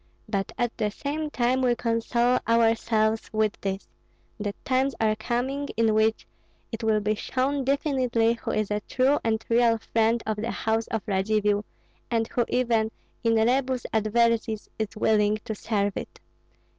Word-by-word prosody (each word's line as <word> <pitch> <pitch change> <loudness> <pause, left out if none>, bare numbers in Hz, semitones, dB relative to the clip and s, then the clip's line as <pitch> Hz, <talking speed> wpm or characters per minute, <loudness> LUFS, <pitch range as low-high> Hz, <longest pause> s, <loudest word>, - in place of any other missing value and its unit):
But 195 -3 -2
at 240 -1 -1
the 210 -2 +1
same 300 +7 -3
time 255 -1 +1
we 245 -2 +3
console 235 +1 +1
ourselves 225 -1 +2
with 215 -1 +1
this, 195 0 -3 0.5
that 205 -1 -3
times 265 +1 +1
are 215 -1 +2
coming 255 +6 -2
in 225 -1 +3
which 220 +1 +2 0.5
it 225 0 -5
will 220 -1 +2
be 210 +1 +1
shown 265 +5 -1
definitely 255 -4 +1
who 235 - -6
is 215 -1 -1
a 210 - +1
true 260 +6 +1
and 225 0 0
real 230 -1 +4
friend 225 +1 +1
of 215 -1 -1
the 225 +3 -3
house 225 0 -1
of 225 -3 -3
Radzivill 205 +1 +1 0.4
and 225 -2 0
who 240 - 0
even 230 -3 +1 0.3
in 230 -1 +3
rebus 255 +3 +1
adversis 220 0 +1
is 215 -1 -3
willing 215 -1 +3
to 220 - -3
serve 205 -2 -1
it. - - -7
225 Hz, 155 wpm, -26 LUFS, 215-245 Hz, 0.5 s, real